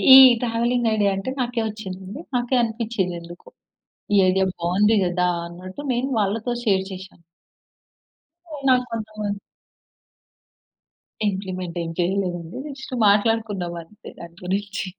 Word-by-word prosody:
ఈ - - +13 0.2
travelling 235 0 +1
idea 205 -2 +2
అంటే, 195 +6 -3
నాకే 245 -2 0
ఒచ్చిందండి. 200 - -7
నాకే 245 +1 +1
అనిపిచ్చిం‌ది 225 -5 -1
ఎందుకో, 170 +1 -12 0.7
ఈ - - +6
ఐడియా 190 +1 +3
బావుంది 190 +6 +3
గదా! 180 0 +1 0.2
అన్నట్టు 185 +10 -9
నేను 250 +3 -1
వాళ్ళతో 215 +4 0
షేర్ 195 -4 +2
చేశా. 190 0 -8 1.4
హ్మ్. 285 -3 -7
నాకు 250 -1 +4
కొంతమంది 215 -2 -4 1.9
ఇంప్లిమెంట్ 185 -3 -4
ఏం 165 - -4
చేయలేదండి. 175 -2 -1 0.2
జస్ట్ 265 -1 -8
మాట్లాడుకున్నాం 205 -4 +1
అంతే 210 +6 -14
దాని 170 0 -10
గురించి. 200 +1 -2
200 Hz, 115 wpm, -23 LUFS, 185-230 Hz, 1.9 s, ఈ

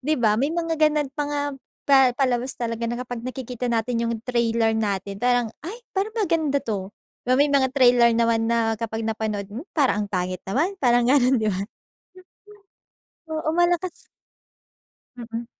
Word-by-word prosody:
'Di 305 +4 0
ba? 215 -4 +2
may 280 - +2
mga 330 -1 -2
ganun 305 -2 +3
pa 295 - -2
nga 290 0 -1 0.4
pa 280 -1 +5 0.2
palabas 255 -1 0
talaga 230 -1 -3
na 240 - -2
kapag 245 -2 -5
nakikita 250 -1 -5
natin 235 0 0
yung 230 - -1
trailer 230 -2 +1
natin 200 -2 -2
parang, 245 -2 +1
"Ay 410 +9 -8
parang 410 +4 -2
maganda 320 -9 +1
'to", 200 -5 -3 0.4
'Ba 255 - +4
may 285 +2 +4
mga 270 -2 +3
trailer 245 -2 +6
naman 230 -1 +2
na 230 -1 +1
kapag 225 0 -3
napanood 220 -2 -2
mo 255 - -7
parang 250 -8 +2
ang - - -9
pangit 185 0 -2
naman 330 - 0
parang 240 -2 +3
ganun, 260 -1 +4
'di 220 -2 0
ba? 195 +2 -3 1.6
Oo 315 0 -1
malakas 350 +1 0 1.1
Mm. 235 0 -6
245 Hz, 160 wpm, -23 LUFS, 225-285 Hz, 1.6 s, trailer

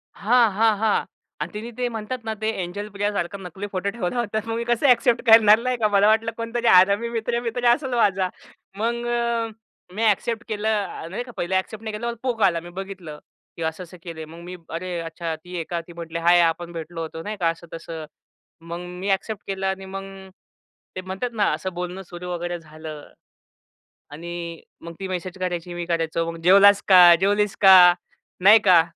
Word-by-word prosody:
हां, 230 +1 +3
हां, 215 +2 +2
हां. 215 0 +1 0.4
आणि - - -3
तिने 220 +3 -6
ते 250 -1 0
म्हणतात 225 +2 -5
ना 220 - -2
ते 220 - 0
एंजल 190 +4 -5
प्रियासारखं 200 -2 -3
नकली 190 +3 -7
फोटो 190 +1 -2
ठेवला 210 0 -3
होता. 220 -2 -1
मग 225 0 -3
मी 230 - -2
कसं 240 +3 +2
एक्सेप्ट 245 -1 +4
करणार? 220 -2 +7
नाही 255 0 -1
का. 220 -2 +2
मला 200 +1 +5
वाटलं 220 +1 +2
कोणतरी 230 +1 -2
हरामी 200 +5 +5
मित्र-बित्र 235 +1 -2
असेल 260 0 -3
माझा. 195 -5 +2 0.5
मग 235 +2 -1
अ, 235 -1 0 0.5
मी 220 - -1
एक्सेप्ट 225 +2 +1
केलं 215 -1 -2 0.2
अ, 165 -2 -8
नाही 195 +8 -4
का 245 - -12
पहला 185 +2 +1
एक्सेप्ट 215 +3 -8
नाही 220 - -4
केलं 235 +2 -3
पोक 245 -4 -2
आला. 175 -3 +3
मी 175 +1 -11
बघितलं, 185 -6 -8 0.4
की - - -8
असं-असं 170 +3 -5
केले. 165 -2 -7
मग 165 +2 -12
मी 180 - -7
"अरे! 175 +1 -4
अच्छा 165 0 -5
ती 180 0 -9
आहे 170 - -2
का?" 170 -1 -2
ती 170 - -11
म्हटली" 170 -1 -6
हाय! 175 0 +6
आपण 170 +1 0
भेटलो 165 0 -6
होतो 160 0 -6
नाही 210 +2 -5
का." 170 -2 +2
असं-तसं. 165 -1 -7 0.6
मग 170 +1 -4 0.2
मी 195 +2 -3 0.2
पोक 220 -3 -5
केलं 195 0 -3
आणि 190 0 -3
मग 195 0 -6 0.9
ते 185 - -4
म्हणतात 190 +6 -4
ना - - +5
असं 185 - -4
बोलणं 180 +2 -5
सुरू 180 0 -9
वगैरे 175 0 -3
झालं. 155 -1 -10 1.0
आणि 170 +1 -7 0.2
मग 170 0 -8
ती 195 - -4
मेसेज 185 0 -5
करायची 175 -1 -3
मी 175 0 -4
करायचो. 165 -1 -1
मग 165 - -9
जेवलास 200 +3 +6
का? 185 -2 +8 0.2
जेवलीस 205 +1 +1
का? 190 -2 +9 0.7
नाही 210 +3 +8
का. 175 -3 +8
190 Hz, 190 wpm, -23 LUFS, 175-220 Hz, 1.0 s, का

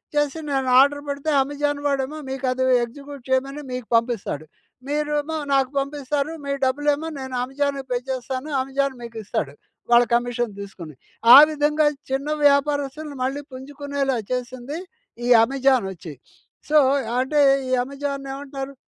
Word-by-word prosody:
చేసి 295 +1 0
నేను 265 -2 0
ఆర్డర్ 285 +1 +3
పెడితే 280 +2 -3
అమెజాన్ 290 +1 -2
వాడేమో 280 +1 -1
మీకు 265 0 -4
అది 260 +1 -1 0.2
ఎగ్జిక్యూట్ 280 +2 -11
చేయమని 275 +3 0
మీకు 250 -3 -5
పంపిస్తాడు. 230 - -1 0.4
మీరేమో 295 +1 -1 0.2
నాకు 270 -1 +3
పంపిస్తారు. 285 +1 -2
మీ 280 - -2
డబ్బులేమో 290 +4 0
నేను 260 -1 -6
అమెజాన్‌కి 275 +1 -2
పే 245 - +1
చేస్తాను. 260 +3 -4
అమెజాన్ 270 0 -1
మీకు 230 -1 -9
ఇస్తాడు. 140 -7 -3 0.4
వాళ్ళ 240 0 +7
కమిషన్ 240 -2 -1
తీసుకొని. 170 -7 -9 0.4
ఆ - - +13
విధంగా 300 0 +2 0.3
చిన్న 275 +2 -1 0.2
వ్యాపారస్తులుని 285 +1 0
మళ్ళీ 270 +2 -2
పుంజుకునేలా 275 0 -3
చేసింది, 255 +4 -4 0.5
ఈ 245 - 0 0.2
అమెజాన్ 265 -3 +2
వచ్చి. 165 -3 -10 0.6
సో 305 - +5 0.4
అంటే 280 +4 +1 0.3
ఈ - - -3
అమెజాన్‌ను 275 0 -5
ఏమంటారు? 275 0 -6
275 Hz, 135 wpm, -23 LUFS, 255-290 Hz, 0.6 s, ఆ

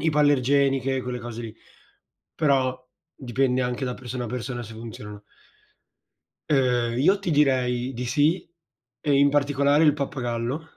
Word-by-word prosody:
ipoallergeniche, 140 -3 +2
quelle 125 0 -4
cose 120 0 -7
lì; 115 0 -8 0.8
però 135 -4 +2 0.4
dipende 130 0 0
anche 125 +2 -2
da 125 - -3
persona 125 0 -6
a 120 - -5
persona 120 0 -4
se 115 0 -10
funzionano. 105 -2 -9 1.3
Ehm, 125 -4 +2
io 190 +8 +4
ti 190 -4 -2
direi 130 -3 +1
di 125 +2 -4
sì 145 +7 +1 0.5
e 150 - -1
in 140 +1 +5
particolare 145 +1 +2
il 150 -2 +5
pappagallo. 130 -1 -3
130 Hz, 135 wpm, -24 LUFS, 120-145 Hz, 1.3 s, in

